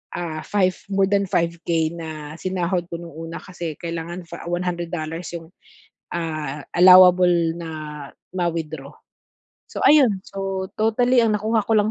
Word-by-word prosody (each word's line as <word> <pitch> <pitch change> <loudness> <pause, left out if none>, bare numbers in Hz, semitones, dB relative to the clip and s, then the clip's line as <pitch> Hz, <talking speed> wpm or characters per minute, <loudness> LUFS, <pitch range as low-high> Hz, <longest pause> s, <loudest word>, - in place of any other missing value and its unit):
ah, 165 -3 -4
5 190 -3 +2 0.2
more 195 0 +2
than 200 0 +2
5k 170 -1 0
na 155 -2 -7
sinahod 180 -1 -1
ko - - -3
no'ng 170 -2 -10
una 165 - -6
kasi 170 -4 -6
kailangan 170 +1 -5
fa 170 - -9
$100 175 -2 -3
'yong, 165 -1 -8 0.7
ah, 155 -4 -4
allowable 180 0 +8 0.3
na 165 - -6 0.7
ma-withdraw. 160 -5 -3 0.8
So, - - -5
ayon 255 -10 +5
so 195 -1 -4
totally 240 +3 +3
ang 220 - +2
nakuha 220 +1 +1
ko 225 - 0
lang 210 0 +3
175 Hz, 135 wpm, -22 LUFS, 165-195 Hz, 0.8 s, allowable